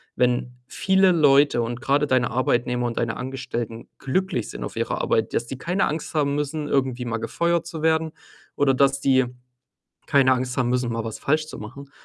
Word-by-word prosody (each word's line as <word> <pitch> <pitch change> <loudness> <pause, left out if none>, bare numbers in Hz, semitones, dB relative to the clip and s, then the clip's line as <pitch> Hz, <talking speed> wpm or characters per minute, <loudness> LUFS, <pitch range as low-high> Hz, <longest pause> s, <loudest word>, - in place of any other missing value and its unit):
wenn 125 0 +1
viele 190 +5 +3
Leute 145 -6 +4
und 120 +1 -4
grade 145 +2 +2
deine 130 -2 +2
Arbeitnehmer 125 0 0
und 120 - -5
deine 115 -1 -1
Angestellten 125 -3 -5
glücklich 135 - -1
sind - - -7
auf - - -6
ihrer - - -2
Arbeit, 110 0 0
dass 120 - -1
die 130 - -6
keine 180 +8 0
Angst 155 +1 -4
haben 140 -2 +1
müssen, 150 +1 -2
irgendwie 130 -3 0
mal 115 -1 -2
gefeuert 170 +9 0
zu 165 -2 -7
werden 160 0 +1 0.4
oder 140 -2 +3
dass 140 +1 +2
die 130 -2 +3 0.8
keine 135 -3 +4
Angst 125 0 -3
haben 125 -2 +1
müssen, 125 -1 0
mal 115 0 -2
was 110 - -6
falsch 155 +2 0
zu - - -9
machen, 140 +6 -10
135 Hz, 190 wpm, -23 LUFS, 120-150 Hz, 0.8 s, Leute